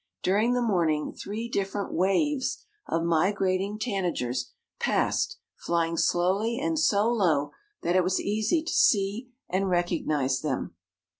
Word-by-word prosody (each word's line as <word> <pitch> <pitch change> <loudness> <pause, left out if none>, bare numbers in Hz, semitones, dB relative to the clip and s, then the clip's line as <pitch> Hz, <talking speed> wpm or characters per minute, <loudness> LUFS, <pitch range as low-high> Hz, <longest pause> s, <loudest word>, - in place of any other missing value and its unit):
During 210 +6 +2
the 245 - +1
morning 165 -8 +1
three 220 +3 -5
different 200 -2 -2
waves 255 - 0 0.2
of 165 0 0
migrating 190 +4 +1
tanagers 175 - -2 0.3
passed, - - 0 0.2
flying 170 -1 -1
slowly 190 +8 +1
and 320 +2 0
so 210 -8 +3
low 165 -11 +1 0.3
that 175 - +1
it 185 - +4
was 185 +1 +1
easy 215 +10 0
to 330 - -3
see 210 +4 +2 0.2
and 190 +1 0
recognize 155 -7 0
them. 140 - -3
195 Hz, 130 wpm, -27 LUFS, 170-220 Hz, 0.3 s, it